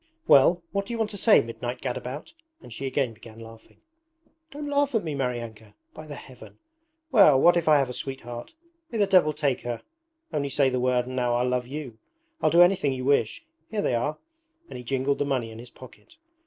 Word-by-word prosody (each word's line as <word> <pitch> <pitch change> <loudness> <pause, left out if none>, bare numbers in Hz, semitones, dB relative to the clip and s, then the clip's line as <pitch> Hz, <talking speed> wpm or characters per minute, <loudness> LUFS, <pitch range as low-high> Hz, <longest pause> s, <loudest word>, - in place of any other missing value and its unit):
'Well, 170 +6 +5
what 200 0 -2
do 235 - -5
you - - -3
want 220 -2 -1
to - - -8
say, 215 +2 +5
midnight 120 +2 -6
gadabout?' 130 +2 -5 0.3
and 120 - -12
she 135 +4 -5
again 130 -3 -1
began 110 0 -14
laughing. 115 0 -14 0.7
'Don't 295 0 -7
laugh 285 -2 +1
at 225 - +1
me, 155 -3 -3
Maryanka! 115 -5 -5 0.2
By 155 - -10
the 145 - -7
Heaven! 130 -2 -13 0.5
Well, 195 - +6
what 175 +5 +6
if 170 -2 0
I 155 -1 +6
have 135 -2 +1
a 125 - -6
sweetheart? 120 - -7 0.3
May 230 - -4
the 205 - +4
devil 185 -6 +4
take 145 -4 -1
her! 120 -1 -5 0.5
Only 140 -2 -1
say 135 -1 +3
the 125 - -1
word 125 -1 +1
and 130 +1 -7
now 125 -1 +1
I'll 125 +1 +1
love 125 -1 -1
you 135 -5 -7 0.4
I'll - - +3
do 170 +1 +7
anything 175 -6 +2
you 130 -1 -5
wish. 145 - +1 0.2
Here 210 -2 -2
they - - 0
are!' 145 +6 -1 0.5
and - - -8
he - - -9
jingled 135 +2 -1
the - - +2
money 130 -5 -2
in 110 - -10
his 120 +1 -10
pocket. 130 - -16
135 Hz, 215 wpm, -26 LUFS, 125-165 Hz, 0.7 s, do